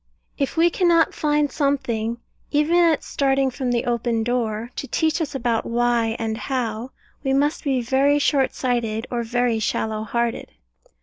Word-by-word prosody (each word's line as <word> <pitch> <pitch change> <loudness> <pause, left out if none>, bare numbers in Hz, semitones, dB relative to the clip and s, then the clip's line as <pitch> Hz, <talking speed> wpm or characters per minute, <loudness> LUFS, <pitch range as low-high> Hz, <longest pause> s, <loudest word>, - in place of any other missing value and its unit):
If 275 +3 -2
we 340 +1 +4
cannot 340 -3 +3
find 295 -2 +1
something, 235 -6 -1 0.3
even 300 +3 +2
at 335 -3 +4
starting 270 -1 +1
from 255 0 -2
the 235 -1 0
open 235 -1 0
door, 230 -1 -2
to 275 - -4
teach 320 +3 0
us 290 -3 -3
about 235 -3 0
Why 235 -1 +1
and 220 -1 -3
How, 245 -2 -3 0.3
we 270 - +1
must 290 +3 +1
be 265 -4 0
very 270 +4 +3
short 280 -2 +1
sighted, 235 -3 -1
or 240 -1 -1
very 240 0 0
shallow 215 0 -1
hearted. 235 +2 -2
250 Hz, 160 wpm, -22 LUFS, 230-285 Hz, 0.3 s, we